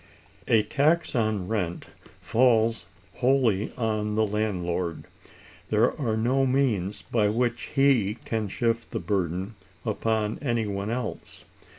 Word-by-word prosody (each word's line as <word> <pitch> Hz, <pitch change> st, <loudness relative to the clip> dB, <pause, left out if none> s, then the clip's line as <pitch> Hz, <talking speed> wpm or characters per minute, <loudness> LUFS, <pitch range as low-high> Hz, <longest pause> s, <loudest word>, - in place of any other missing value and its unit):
A 110 Hz, -3 st, +4 dB
tax 155 Hz, +8 st, +1 dB
on 110 Hz, -6 st, 0 dB
rent 90 Hz, -6 st, -2 dB, 0.4 s
falls 115 Hz, -2 st, +2 dB, 0.3 s
wholly 125 Hz, -6 st, +2 dB
on 110 Hz, -3 st, -1 dB
the 110 Hz, 0 st, +3 dB
landlord. 90 Hz, -5 st, -2 dB, 0.7 s
There 110 Hz, +3 st, +3 dB
are 110 Hz, -4 st, 0 dB
no 125 Hz, +5 st, +2 dB
means 125 Hz, -8 st, 0 dB
by 105 Hz, -3 st, +1 dB
which 120 Hz, +2 st, -1 dB
he 130 Hz, -7 st, +3 dB
can 110 Hz, -2 st, -1 dB
shift 115 Hz, +3 st, -1 dB
the -, -, -3 dB
burden 95 Hz, +1 st, -2 dB, 0.3 s
upon 110 Hz, 0 st, -1 dB
any 120 Hz, -5 st, 0 dB
one 100 Hz, 0 st, -3 dB
else. 120 Hz, 0 st, -5 dB
110 Hz, 120 wpm, -26 LUFS, 105-120 Hz, 0.7 s, A